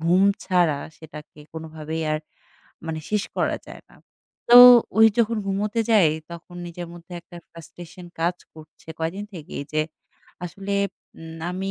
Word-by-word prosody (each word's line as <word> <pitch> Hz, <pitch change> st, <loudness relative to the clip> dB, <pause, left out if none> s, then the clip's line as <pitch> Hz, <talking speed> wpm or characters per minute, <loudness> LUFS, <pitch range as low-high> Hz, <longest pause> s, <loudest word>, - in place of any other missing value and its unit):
ঘুম 175 Hz, +4 st, +3 dB, 0.2 s
ছাড়া, 175 Hz, -6 st, +2 dB, 0.2 s
সেটাকে 150 Hz, -1 st, -12 dB, 0.2 s
কোনোভাবেই 160 Hz, 0 st, -6 dB
আর 155 Hz, -, 0 dB, 0.7 s
মানে 160 Hz, -1 st, -3 dB
শেষ 210 Hz, -1 st, +1 dB
করা -, -, 0 dB
যায় -, -, -11 dB
না। -, -, -19 dB, 0.5 s
তো 240 Hz, -, +7 dB, 0.4 s
ওই 225 Hz, -, +9 dB
যখন 230 Hz, 0 st, +2 dB
ঘুমোতে 210 Hz, +3 st, -1 dB
যাই, 190 Hz, -8 st, +5 dB, 0.2 s
তখন 170 Hz, +1 st, -11 dB
নিজের 175 Hz, 0 st, -7 dB
মধ্যে 175 Hz, +1 st, -14 dB
একটা 175 Hz, +1 st, -15 dB
frustration 175 Hz, +2 st, -12 dB
কাজ 175 Hz, +2 st, +1 dB, 0.2 s
করছে 155 Hz, +1 st, -17 dB
কয়েকদিন 175 Hz, +6 st, -3 dB
থেকেই 150 Hz, -3 st, -7 dB
যে, 155 Hz, -, +1 dB, 0.6 s
"আসলে 195 Hz, +3 st, -5 dB, 0.5 s
উম 165 Hz, 0 st, -9 dB
আমি 190 Hz, +2 st, -4 dB
170 Hz, 145 wpm, -23 LUFS, 160-190 Hz, 0.7 s, ওই